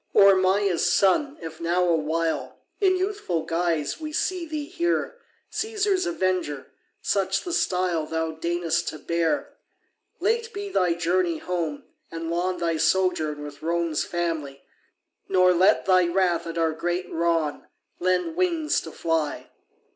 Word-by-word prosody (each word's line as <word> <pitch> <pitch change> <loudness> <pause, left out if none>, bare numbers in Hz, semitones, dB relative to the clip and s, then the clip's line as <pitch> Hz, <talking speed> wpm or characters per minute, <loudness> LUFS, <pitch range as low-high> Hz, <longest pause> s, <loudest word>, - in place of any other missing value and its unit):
Or 200 0 +8
Maia's 190 -1 +2
son, 270 +10 +3
if 160 -1 -8
now 175 +2 +1
awhile 165 0 0 0.2
In 380 -2 +4
youthful 370 - -2
guise 165 - -1
we 310 -1 -5
see 350 +2 -1
thee 305 -2 -4
here, 350 +9 -1 0.3
Caesar's 410 -4 0
avenger 185 - -1 0.3
such 195 -1 +1
the 350 - -4
style 180 - 0
Thou 160 0 -1
deign'st 170 +1 -1
to - - -3
bear; 170 - -1 0.7
Late 460 0 0
be 405 0 -5
thy 180 - +2
journey 175 0 +1
home, 165 -4 -3 0.3
and 165 0 -5
long 180 +2 0
Thy 170 -2 0
sojourn 155 -5 +1
with 145 -1 -9
Rome's 165 -1 0
family; 160 -6 -3 0.7
Nor 185 -1 +5
let 190 +4 +4
thy 185 -2 +4
wrath 175 -1 +1
at 165 - -5
our 165 -1 +2
great 175 +2 -2
wrong 165 -3 0 0.3
Lend 185 - 0
wings 340 -4 +1
to 160 - -9
fly. 160 -3 -2
175 Hz, 140 wpm, -25 LUFS, 165-205 Hz, 0.7 s, Or